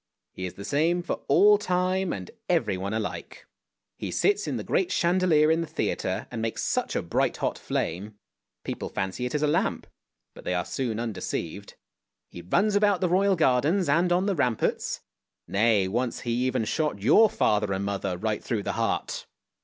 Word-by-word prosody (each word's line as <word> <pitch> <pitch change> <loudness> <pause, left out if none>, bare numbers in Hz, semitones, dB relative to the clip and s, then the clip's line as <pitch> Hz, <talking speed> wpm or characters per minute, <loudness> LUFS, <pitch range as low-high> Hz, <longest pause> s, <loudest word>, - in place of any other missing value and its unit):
He 95 - -4
is 90 - -9
the 100 - -8
same 165 +8 +1
for - - -3
all 205 0 +6
time 185 -1 0
and 95 -2 -6 0.2
everyone 95 +1 0
alike. 110 -1 -5 0.5
He - - -4
sits 410 0 +1
in - - -2
the - - -4
great 365 - 0
chandelier 170 -3 +3
in 165 +1 +2
the 165 - -3
theatre, 120 -11 -2
and 115 -2 -4
makes 115 0 -2
such - - -1
a - - 0
bright - - 0
hot - - -2
flame; 100 +6 -3 0.5
people - - -4
fancy 95 +7 -3
it 125 - -5
is 150 - 0
a - - +3
lamp, 145 - 0 0.5
but - - -13
they 90 - -1
are 90 0 -1
soon 120 -5 -2
undeceived. 115 -4 -4 0.5
He 85 - -9
runs 200 - +1
about 205 -2 +3
the 180 - +1
Royal 195 +2 +3
Gardens 160 +5 +2
and 170 +5 +2
on 180 +2 +2
the 200 - +1
ramparts; 125 - -1 0.5
nay, 105 -1 +3
once 120 +5 -2
he 120 - -3 0.2
even 130 -3 0
shot 150 -4 -1
your 215 - +6
father 105 - +1
and 95 +1 -1
mother 100 -2 -2
right 110 +2 -2
through 110 -5 -2
the - - -2
heart! - - -2
130 Hz, 185 wpm, -26 LUFS, -, 0.5 s, all